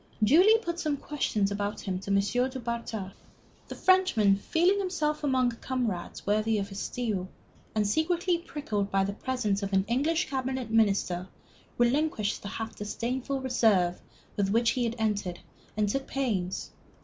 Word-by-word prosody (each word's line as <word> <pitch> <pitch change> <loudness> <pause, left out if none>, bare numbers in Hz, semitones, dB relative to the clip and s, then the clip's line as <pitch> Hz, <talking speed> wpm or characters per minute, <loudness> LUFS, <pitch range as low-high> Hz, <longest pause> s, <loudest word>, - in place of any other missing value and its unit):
Julie 360 - +6
put 345 -6 -4
some 300 -4 0
questions 215 -9 -1
about 205 0 -2
him 185 -2 -3
to 195 - -8
M. 200 - +3 0.3
du 260 0 -6
Bartas. 230 -4 -4 0.6
The - - -7
Frenchman 370 - +4
feeling 350 - +2
himself 310 -6 -1
among 260 -3 +2
comrades 230 -6 -3
worthy 215 +2 +2
of 200 -1 -2
his 195 0 -6
steel, 210 -7 -2 0.5
and 215 -1 +2
secretly 340 - +1
pricked 295 -7 -8 0.2
by 195 -1 +2
the 200 +1 -2
presence 215 -4 -1
of 200 0 -4
an 190 0 +3
English 315 - +1
cabinet 260 -3 -3
minister, 195 -5 +2 0.5
relinquished 240 -3 +1
the - - -7
half 225 +3 -5
disdainful 250 +6 -3
reserve 200 -9 +2 0.4
with 200 -1 +1
which 230 +3 +3
he 250 -2 0
had 230 0 -2
entered, 205 -5 -1 0.4
and 210 -1 +2
took 270 +6 -2
pains. 200 -9 -2
230 Hz, 155 wpm, -28 LUFS, 200-275 Hz, 0.6 s, Julie